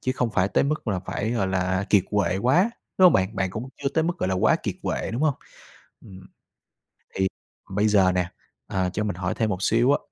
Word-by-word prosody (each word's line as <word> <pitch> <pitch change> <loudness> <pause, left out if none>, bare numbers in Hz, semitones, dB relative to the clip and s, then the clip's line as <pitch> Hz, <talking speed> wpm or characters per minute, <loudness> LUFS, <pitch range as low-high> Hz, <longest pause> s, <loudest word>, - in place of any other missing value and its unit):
chứ 130 - -1
không 125 -3 0
phải 95 -1 +1
tới 95 - +2
mức 150 -4 -2
là 95 -3 0
phải, 105 +4 -3
gọi 115 -5 0
là, 95 +1 0
kiệt 100 -3 +4
quệ 105 -3 +1
quá, 145 - +3 0.3
đúng 185 - +6
hông 175 - +6
bạn? 95 +3 +1
Bạn 95 -1 0
cũng 110 +6 -6
chưa 140 - +1
tới 160 +3 0
mức, 175 +1 -2
gọi 95 - -1
là, 95 - 0
quá 90 - +3
kiệt - - -2
quệ, - - -2
đúng 125 - -2
hông? 155 -4 +3 0.7
Ừm, 95 -1 -13 0.9
thì 95 0 +1 0.4
bây 105 +3 +1
giờ 95 -3 +4
nè, 90 -1 -1 0.4
ờ, 95 -1 -1
cho 105 - -1
mình 105 -4 -3
hỏi 90 0 -2
thêm 110 -2 0
một 95 -1 -3
xíu 120 +7 +3
á, - - +2
100 Hz, 235 wpm, -24 LUFS, 95-125 Hz, 0.9 s, đúng